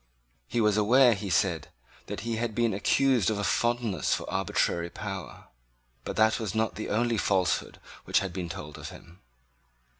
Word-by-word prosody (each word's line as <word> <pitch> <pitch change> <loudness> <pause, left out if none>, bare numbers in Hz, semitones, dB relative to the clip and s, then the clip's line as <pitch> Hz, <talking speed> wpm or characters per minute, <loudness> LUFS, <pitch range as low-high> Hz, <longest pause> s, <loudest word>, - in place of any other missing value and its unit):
He 120 - -1
was 105 -1 +3
aware, 120 +4 +5
he 100 -1 -5
said, 90 -3 +1 0.4
that - - -5
he 115 -1 -3
had 115 -2 -2
been 115 -2 +1
accused 125 +3 +2
of 110 - -1
a 105 - -2
fondness 120 -3 +1
for - - -6
arbitrary 85 0 0
power. 95 -1 -7 0.6
But - - -4
that 110 +1 +3
was 110 -2 -4
not 110 0 +1
the 110 - -5
only 115 +2 +1
falsehood 90 -11 0 0.3
which - - +2
had 95 -3 0
been 90 -3 -4
told 75 -4 -8
of - - -7
him. 85 +2 -14
105 Hz, 175 wpm, -28 LUFS, 95-115 Hz, 0.6 s, aware